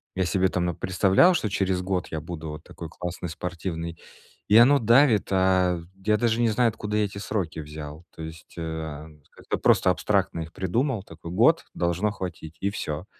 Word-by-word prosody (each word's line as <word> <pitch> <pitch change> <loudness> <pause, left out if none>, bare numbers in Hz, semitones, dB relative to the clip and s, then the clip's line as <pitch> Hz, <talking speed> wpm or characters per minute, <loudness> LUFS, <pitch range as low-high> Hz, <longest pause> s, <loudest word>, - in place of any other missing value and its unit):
я 95 - +1
себе 95 0 +2
там 90 -1 -1
напредставлял, 95 - +3
что 110 -10 0
через 95 -2 0
год 90 -1 -2
я 80 - -3
буду 80 -1 -6
вот 75 - -8
такой 85 - -9
классный 90 +1 -5
спортивный. 85 0 -5 0.5
И 105 - +7
оно 130 +5 +7
давит, 115 -1 +4
а 95 -2 +3 0.3
я 105 0 +3
даже 115 +1 +1
не 115 - +3
знаю, 120 +3 +3
откуда 105 -1 -3
эти 100 -1 -1
сроки 95 -5 -3
взял, 75 +1 -8
то - - -9
есть, 80 +1 -10
а, 80 -2 -5 0.2
как-то - - -4
просто - - +4
абстрактно 85 - 0
их 80 0 -7
придумал, 115 +4 -1
такой: 85 -1 -10
"Год- 120 - +4
должно 90 +4 0
хватить". 80 -5 -7
И 100 - +1
всё. 75 -4 -4
90 Hz, 175 wpm, -25 LUFS, 80-105 Hz, 0.5 s, И